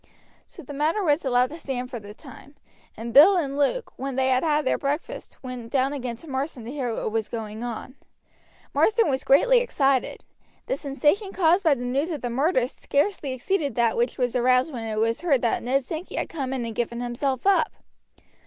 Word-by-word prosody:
So 340 - -12
the 285 - -9
matter 310 +8 0
was 305 -1 +2
allowed 250 -1 +2
to 320 - -8
stand 255 -3 -4
for 240 - -5
the 205 0 -11
time; 275 +1 -13 0.4
and 230 +1 -6
Bill 315 +9 +8
and 280 -6 -1
Luke, 290 - 0
when 270 -1 -4
they 265 0 +2
had 255 0 +3
had 300 -2 +1
their - - +1
breakfast, 295 - -4
went 250 -3 -7
down 270 +1 +1
again 250 -4 -4
to 320 - -13
Marsden 265 -3 -4
to 240 - -6
hear 265 -4 -2
what 220 - -3
was 220 -1 -1
going 220 0 -6
on. 245 +1 -6 0.8
Marsden 440 -7 +3
was 265 - -1
greatly - - +5
excited. 275 - 0 0.4
The - - -1
sensation 300 - 0
caused 355 +1 +3
by 315 -4 +4
the 245 -1 -5
news 275 +7 0
of 310 -5 -4
the 245 - -3
murder 260 0 +2
scarcely 285 +2 -1
exceeded 280 - -1
that 235 -2 +2
which 240 +1 0
was 245 -1 0
aroused 255 +4 +3
when 230 -3 -5
it 215 -1 -3
was 230 +1 +1
heard 290 -8 +2
that 235 - +1
Ned 265 +3 0
Sankey 320 +6 -6
had - - -2
come 275 -5 -4
in 255 -3 -2
and 230 - -5
given 235 +1 -2
himself 245 +3 -2
up. 395 0 +3
270 Hz, 210 wpm, -25 LUFS, 245-305 Hz, 0.8 s, Bill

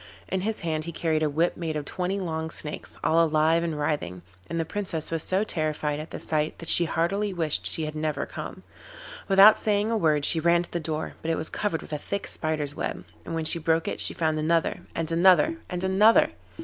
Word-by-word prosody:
In 190 - -2
his 220 +3 -1
hand 155 -2 -2
he 170 - -4
carried 160 -1 -1
a 155 - +2
whip 165 +4 +1
made 165 -2 -4
of 150 -1 -3
twenty 185 +5 -2
long 160 -3 -3
snakes, 150 -2 -6
all 165 +1 +4
alive 160 +1 +2
and 165 -3 -2
writhing, 90 - -2 0.3
and 165 - -2
the 165 - 0
Princess 165 -4 -3
was 165 -1 0
so 190 +5 +2
terrified 155 -5 -2
at 155 - -7
the - - -7
sight 155 -1 -1
that 165 - -3
she 175 - +6
heartily 195 +6 0
wished 150 - +1
she 155 +12 0
had 155 - -5
never 155 -2 -2
come. - - -8 0.6
Without 195 +2 +7
saying 210 +1 +1
a - - +1
word 150 -6 +2
she 165 - +4
ran 170 +1 +3
to - - -13
the 175 - -2
door, 155 -1 -4
but 160 - -4
it 165 - +1
was 155 - -2
covered 200 -6 -2
with - - -9
a 150 - -2
thick 200 +6 -4
spider's 155 -3 -3
web, - - -4 0.2
and - - -4
when 160 -1 -2
she 170 - +3
broke 165 0 +1
it - - -2
she - - -2
found 160 -2 0
another, 165 +2 +1 0.2
and 165 0 -2
another, 185 - +4
and 180 0 -4
another. 200 +4 +5
165 Hz, 225 wpm, -26 LUFS, 155-175 Hz, 0.6 s, Without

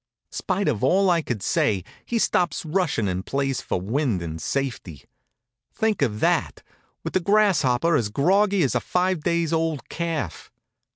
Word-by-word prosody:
Spite 195 +1 -2
of 120 -7 0
all 185 +7 +4
I 170 -1 +2
could 120 -9 -4
say, 95 -4 +1 0.2
he 235 - -2
stops 175 -6 +1
rushin' 160 - 0
and 95 0 -2
plays 135 +1 -1
for - - -2
wind 110 - -1
and 80 -1 -6
safety. 120 - -3 0.7
Think 220 -5 0
of 110 -6 0
that, - - 0 0.4
with - - -5
the - - +3
Grasshopper 170 -7 +2
as 115 -7 +1
groggy 190 - +2
as 135 - +1
a - - +2
five 180 -2 0
days 170 0 0
old 160 -5 -1
calf! 165 - -4
150 Hz, 160 wpm, -24 LUFS, 115-180 Hz, 0.7 s, all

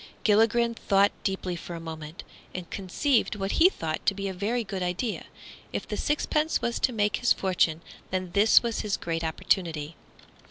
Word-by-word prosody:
Gilligren 225 +2 +4
thought 200 -3 +3
deeply 190 -2 -2
for 170 0 -7
a - - -6
moment, 160 0 -8 0.3
and 180 -2 -5
conceived 220 +6 +1
what 195 -1 -2
he 360 - +9
thought 160 - -4
to 200 - +3
be 200 0 -3
a 190 - -3
very 220 +6 -1
good 195 -2 -5
idea. 180 +5 -2 0.5
If - - -4
the - - -3
sixpence 305 +1 0
was 235 0 -1
to 260 - +2
make 210 -3 +1
his 240 - +4
fortune, 175 -4 +1 0.3
then 185 -1 -3
this 210 +4 +6
was 230 -1 -2
his 210 -2 -1
great 165 0 -3
opportunity. 160 -1 -1
195 Hz, 175 wpm, -27 LUFS, 175-225 Hz, 0.5 s, he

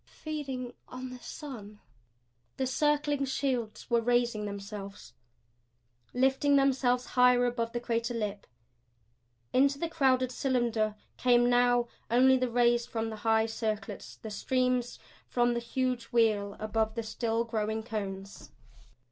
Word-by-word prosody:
"Feeding 270 -6 -6
on 255 0 -7
the 250 - -9
sun!" 225 -9 -9 0.8
The 265 - 0
circling 290 +1 +1
shields 255 -4 -2
were 235 -1 +2
raising 240 -2 +1
themselves, 200 0 -7 1.0
lifting 265 +3 +3
themselves 260 -2 +2
higher 250 0 +5
above 235 -1 -1
the 240 - -2
crater 235 0 -2
lip. 210 -3 -4 1.1
Into 275 +2 +4
the 335 - -2
crowded 260 -5 +2
cylinder 235 -5 0 0.2
came 245 -1 +4
now 245 0 +3 0.2
only 255 +3 +5
the 255 -1 0
rays 240 0 +3
from 225 -1 -3
the 220 - -6
high 220 0 +2
circlets, 220 -1 -4
the 220 - -9
streams 250 +2 0 0.3
from 240 0 +2
the 235 - -1
huge 250 0 -2
wheel 215 -4 +1
above 215 0 -1
the 230 - -2
still 225 +1 -1
growing 220 -1 -2
cones. 200 -3 -6
240 Hz, 130 wpm, -30 LUFS, 220-255 Hz, 1.1 s, higher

